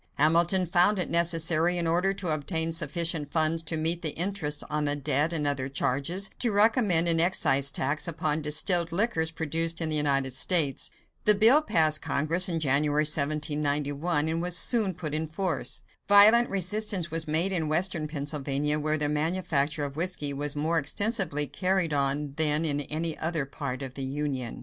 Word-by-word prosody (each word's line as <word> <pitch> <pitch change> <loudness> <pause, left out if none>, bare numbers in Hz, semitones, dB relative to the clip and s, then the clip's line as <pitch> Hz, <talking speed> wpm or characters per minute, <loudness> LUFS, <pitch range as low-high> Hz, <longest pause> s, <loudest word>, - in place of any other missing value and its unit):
Hamilton 170 +5 +2
found 180 +4 +2
it 180 - -3
necessary, 170 0 +2
in 170 - -1
order 175 +4 +1
to 190 -3 -4
obtain 160 +2 -1
sufficient 165 -1 -2
funds 160 0 +1
to 165 0 -3
meet 165 +2 -1
the 155 -3 -3
interest 170 -5 -1
on 150 0 -2
the 145 0 0
debt 145 +2 -1
and 155 -3 -2
other 140 -2 -1
charges, 145 +9 -2
to 240 - +1
recommend 205 -5 +3
an 165 -1 +3
excise 140 -6 +3
tax 150 +4 -1
upon 160 -2 -2
distilled 165 +3 +1
liquors 170 -4 0
produced 165 +1 -1
in 160 -2 -2
the 155 - -1
United 135 -3 0
States. 145 0 +1 0.4
The 210 - +5
bill 230 +9 +5
passed 155 - +2
Congress 165 +6 +3
in 165 -2 -2
January, 150 +1 +1
1791, 150 +1 -1
and 165 +1 -2
was 180 0 +1
soon 210 -2 +3
put 155 -3 -6
in 155 +1 -2
force. 175 +3 -2 0.3
Violent 215 +4 +6
resistance 195 -2 0
was 165 -1 -2
made 165 +5 0
in 165 -5 -2
western 165 -1 0
Pennsylvania, 145 0 -3
where 155 +1 -1
the 150 -1 -1
manufacture 150 -1 -2
of 140 +1 -8
whiskey 165 -4 -1
was 145 +1 -4
more 160 +3 0
extensively 170 -1 +1
carried 185 0 -1
on 140 0 -1
than 155 0 0
in 145 -2 -1
any 155 +3 -4
other 160 -3 -2
part 135 -1 -6
of 130 -1 -8
the 135 - -7
Union. 135 -3 -4
160 Hz, 175 wpm, -26 LUFS, 145-175 Hz, 0.4 s, Violent